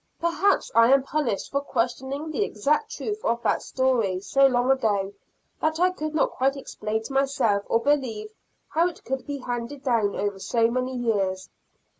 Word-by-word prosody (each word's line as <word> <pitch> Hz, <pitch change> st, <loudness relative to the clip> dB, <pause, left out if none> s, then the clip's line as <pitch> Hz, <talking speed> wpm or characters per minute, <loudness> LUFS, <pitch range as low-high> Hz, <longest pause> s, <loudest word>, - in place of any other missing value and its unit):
Perhaps 340 Hz, +4 st, +1 dB
I 230 Hz, +2 st, +6 dB
am 270 Hz, -1 st, +5 dB
punished 275 Hz, -8 st, -2 dB
for 280 Hz, -, 0 dB
questioning 270 Hz, +4 st, -2 dB
the 415 Hz, -, 0 dB
exact 300 Hz, -, 0 dB
truth 430 Hz, -1 st, -5 dB
of 235 Hz, 0 st, 0 dB
that -, -, +1 dB
story, 240 Hz, -8 st, 0 dB
so 275 Hz, +8 st, +4 dB
long 250 Hz, 0 st, +2 dB
ago, 205 Hz, -7 st, +1 dB, 0.5 s
that 315 Hz, +1 st, 0 dB
I 365 Hz, +1 st, +4 dB
could 310 Hz, -3 st, -5 dB
not 305 Hz, -, +2 dB
quite 270 Hz, +2 st, 0 dB
explain 220 Hz, -4 st, -4 dB
to 270 Hz, -, -7 dB
myself 270 Hz, -7 st, +2 dB
or 230 Hz, -, +2 dB
believe 230 Hz, -6 st, -1 dB, 0.4 s
how 330 Hz, +4 st, +2 dB
it 355 Hz, -, -8 dB
could 265 Hz, +1 st, -4 dB
be 285 Hz, -1 st, -3 dB
handed 245 Hz, +2 st, -5 dB
down 230 Hz, -6 st, +1 dB
over 200 Hz, -1 st, -2 dB
so 230 Hz, +3 st, +1 dB
many 255 Hz, +1 st, -2 dB
years. 195 Hz, -6 st, -1 dB
260 Hz, 175 wpm, -25 LUFS, 225-285 Hz, 0.5 s, I